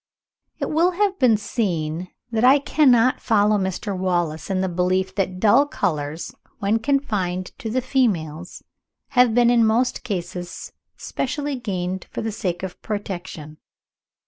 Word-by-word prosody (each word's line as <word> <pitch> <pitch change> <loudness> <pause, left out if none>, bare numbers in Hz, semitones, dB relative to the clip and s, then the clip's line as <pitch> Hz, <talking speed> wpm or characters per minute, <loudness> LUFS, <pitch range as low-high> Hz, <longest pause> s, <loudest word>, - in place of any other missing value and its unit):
It - - -3
will 340 +4 +3
have 390 +1 0
been 240 -5 +5
seen 180 -6 -2 0.2
that 225 0 0
I 265 +3 +7
cannot 255 -4 +3
follow 210 -2 +3
Mr. 190 +1 -3
Wallace 175 -4 -1
in 190 -1 0
the 190 - 0
belief 185 +1 0
that 185 -2 -2
dull 225 +8 +5
colours, 155 - -3 0.2
when 210 +2 +1
confined 210 -9 -1
to 225 - -4
the 255 +3 -1
females, 180 - -1 0.5
have 245 -3 +4
been 240 -1 +5
in 235 -1 +4
most 230 +3 +1
cases 175 -5 -5 0.3
specially 290 +1 -3
gained 185 -6 -4
for - - -5
the 225 - -2
sake 180 -3 -3
of 190 -2 -6
protection. 175 -7 -6
205 Hz, 145 wpm, -22 LUFS, 180-245 Hz, 0.5 s, I